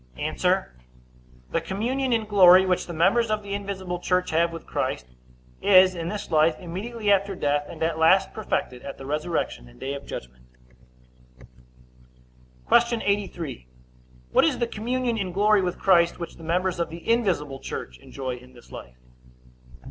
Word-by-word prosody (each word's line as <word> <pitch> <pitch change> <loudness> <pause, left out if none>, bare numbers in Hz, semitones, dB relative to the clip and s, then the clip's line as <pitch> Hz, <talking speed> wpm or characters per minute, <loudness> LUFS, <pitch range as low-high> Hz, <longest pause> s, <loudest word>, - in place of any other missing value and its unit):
A. - - -2 1.2
The 165 - 0
communion 240 +10 -2
in 225 -2 +1
glory 190 -3 +7
which 185 -1 0
the - - -6
members 200 +8 +2
of 215 -1 -1
the 200 0 -6
invisible 190 -3 -4
church 180 +1 0
have 165 +1 +2
with 165 -1 -9
Christ, 60 - -3 0.6
is 185 -2 +6
in 170 -2 -5
this 210 -2 -6
life, 155 0 +3
immediately 205 +5 -3
after 200 0 +2
death, 145 -2 0
and - - -6
at 165 0 -1
last 190 +4 +4
perfected 130 - -3
at 140 - -8
the 135 - -10
resurrection 150 - -3
and - - -19
day 135 - -4
of 140 0 -8
judgment. 60 0 -8 2.2
Q. 235 0 +3
83. 175 - -3 0.6
What - - +4
is 165 - +2
the 240 - 0
communion 235 +1 -2
in 185 -2 -3
glory 210 +1 +4
with 180 -1 -2
Christ 170 -3 +3
which 170 -1 -7
the 165 - -13
members 180 +2 -1
of 170 -1 -1
the 165 +1 -10
invisible 185 - 0
church 65 - -7
enjoy 130 - -6
in 125 +1 -16
this 120 - -17
life? 60 0 -10
180 Hz, 165 wpm, -25 LUFS, 155-205 Hz, 2.2 s, glory